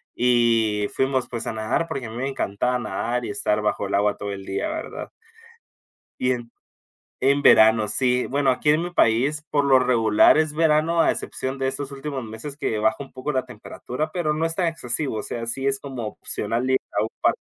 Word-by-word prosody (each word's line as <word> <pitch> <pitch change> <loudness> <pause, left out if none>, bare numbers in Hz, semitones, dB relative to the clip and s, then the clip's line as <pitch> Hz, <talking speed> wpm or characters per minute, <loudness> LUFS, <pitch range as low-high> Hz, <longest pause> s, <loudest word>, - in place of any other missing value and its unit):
y 115 -4 +2
fuimos, 130 -1 0
pues 120 -2 -4
a - - -2
nadar, 110 +10 -1
porque 130 -4 -4
a - - -8
mí 115 - -7
me 130 - -2
encantaba 125 0 -1
nadar 120 +3 -2
y - - -5
estar 105 +1 0
bajo 105 -1 -1
el 100 - -1
agua 105 +1 +1
todo 100 0 -5
el 95 -1 -8
día, 95 - -2
¿verdad? 315 0 -6 1.1
Y 125 0 +2
en 120 -2 -5 0.7
en 140 +2 +2
verano, 110 -1 +6
sí, 125 +3 +1
bueno, 140 0 +1
aquí 150 +4 +1
en 155 - +3
mi 175 - -4
país, 140 +3 +2
por 145 -1 +2
lo 135 -2 +5
regular, 115 -1 +4
es 155 -1 +1
verano, 160 +1 +2
a - - +4
excepción 130 +1 -4
de 135 - -1
esos 135 +1 -3
últimos 140 -1 -5
meses 110 +6 -8
que 110 -7 -2
baja 110 +1 +1
un 135 - -13
poco 130 +3 -4
la 130 -2 0
temperatura, 125 +5 -6
pero 170 -4 0
no 160 +2 0
es 165 - -2
tan 175 -3 +1
excesivo, 135 -4 -3
o 105 - -3
sea, 115 - -4
sí 135 +3 -2
es 135 0 +1
como 130 -5 -6
opcional 115 +4 -2
ir 130 - +4 0.2
a 105 - +3
un 110 - -1
parque, - - +1
125 Hz, 210 wpm, -23 LUFS, 110-145 Hz, 1.1 s, verano